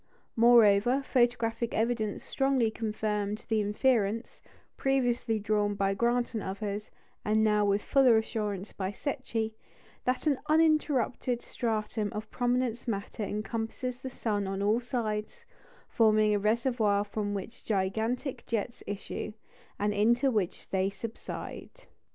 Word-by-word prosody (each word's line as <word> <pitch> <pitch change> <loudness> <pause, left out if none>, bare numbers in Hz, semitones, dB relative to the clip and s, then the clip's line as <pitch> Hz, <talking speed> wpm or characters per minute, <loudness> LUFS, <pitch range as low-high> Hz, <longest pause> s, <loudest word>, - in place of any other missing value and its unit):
Moreover, 235 +2 +5
photographic 240 -2 +1
evidence 220 -2 0
strongly 270 -5 +1
confirmed 210 -1 -2
the 220 -1 +2
inference 215 +1 0 0.3
previously 245 -4 +1
drawn 210 -1 0
by 195 0 +1
Grant 240 +3 +1
and 220 - -2
others, 200 +2 -4 0.3
and 215 +1 +2
now 210 -1 +3
with 200 0 +1
fuller 260 -5 +5
assurance 210 -3 -3
by 190 -1 -3
Secchi 225 -2 -3 0.5
that 255 +3 0
an 285 -4 +2
uninterrupted 295 -6 +2
stratum 215 -2 -2
of 215 +1 -6
prominence 245 -1 0
matter 200 0 -3
encompasses 225 +4 -3
the 260 - -6
sun 210 -5 -2
on 195 +1 -2
all 215 +3 +3
sides, 240 - -3 0.4
forming 215 -2 +4
a 205 - +2
reservoir 215 -1 +2
from 205 0 -3
which 200 +4 -7
gigantic 220 +7 -1
jets 230 +1 -2
issue, 205 +1 -5 0.4
and 205 0 0
into 240 +6 +3
which 205 -6 -2
they 190 0 +1
subside. 230 - -8
220 Hz, 125 wpm, -29 LUFS, 205-245 Hz, 0.5 s, Moreover